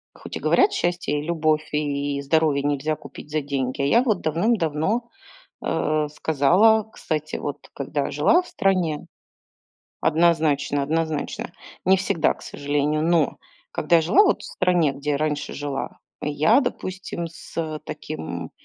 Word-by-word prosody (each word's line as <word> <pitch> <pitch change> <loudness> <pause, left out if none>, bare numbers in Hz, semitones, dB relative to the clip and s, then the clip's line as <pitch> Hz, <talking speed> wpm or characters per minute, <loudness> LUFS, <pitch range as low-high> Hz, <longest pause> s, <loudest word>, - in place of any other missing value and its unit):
Хоть - - -9
и - - -3
говорят, 395 +1 +4
счастье, 175 - -1
и - - -3
любовь, 155 -1 +1
и 145 -1 -1
здоровье 145 0 +2
нельзя 145 +2 0
купить 150 - -12
за 155 0 0
деньги. 135 -2 -3
А - - +2
я 235 +11 +5
вот 220 -7 +1
давным-давно, 170 +4 0 0.6
э, 155 -1 0
сказала, 180 +11 +4
кстати, 155 -6 -4
вот - - -5
когда - - -2
жила 355 - +4
в 360 - -14
стране. 180 -6 0 0.9
Однозначно, 155 -3 +2
однозначно. 160 0 -2 0.3
Не 190 +1 +5
всегда, 170 -4 +1
к - - -18
сожалению. 145 +1 -1
Но 165 -4 +2 0.4
когда 155 +3 +3
я 165 - +3
жила 345 - +5
вот - - +2
в - - -8
стране, 175 -6 +2
где 145 +1 -2
раньше 150 0 -2
жила, 140 -1 -4 0.2
я, 155 - +3
допустим, 185 -8 -4
с 160 -1 -5
таким 85 - -6
155 Hz, 140 wpm, -23 LUFS, 145-175 Hz, 0.9 s, я